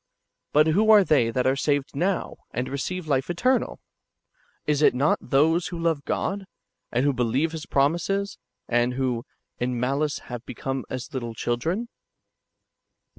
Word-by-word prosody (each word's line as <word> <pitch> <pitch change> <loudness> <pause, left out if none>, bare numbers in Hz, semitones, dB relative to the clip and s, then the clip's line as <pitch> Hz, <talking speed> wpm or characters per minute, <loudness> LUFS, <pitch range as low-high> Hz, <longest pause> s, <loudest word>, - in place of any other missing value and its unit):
But 150 +1 +5
who 200 +8 +3
are 210 -2 +8
they 140 -10 +3
that 125 +2 0
are 130 +1 +3
saved 145 0 0
now, 180 +5 -1
and 125 +1 -3
receive 170 +6 -3
life 135 -1 +1
eternal? 250 +9 +1 0.9
Is 150 -1 +1
it 150 - +5
not 140 +4 +2
those 160 +6 +2
who 175 - -5
love 165 -4 0
God, 195 0 -2 0.5
and 125 +3 +1
who 145 - +3
be 125 - -2
lieve 135 +8 +1
His 160 -2 -6
promises, 175 +8 0 0.3
and 120 +1 +1
who 130 -2 0
"■ 115 - -7 0.4
in 125 0 -1
malice 140 +4 0
have 120 -1 -8
become 135 +1 -4
as 130 -1 -6
little 120 -3 -4
children?" 165 - -1
140 Hz, 160 wpm, -25 LUFS, 125-170 Hz, 0.9 s, are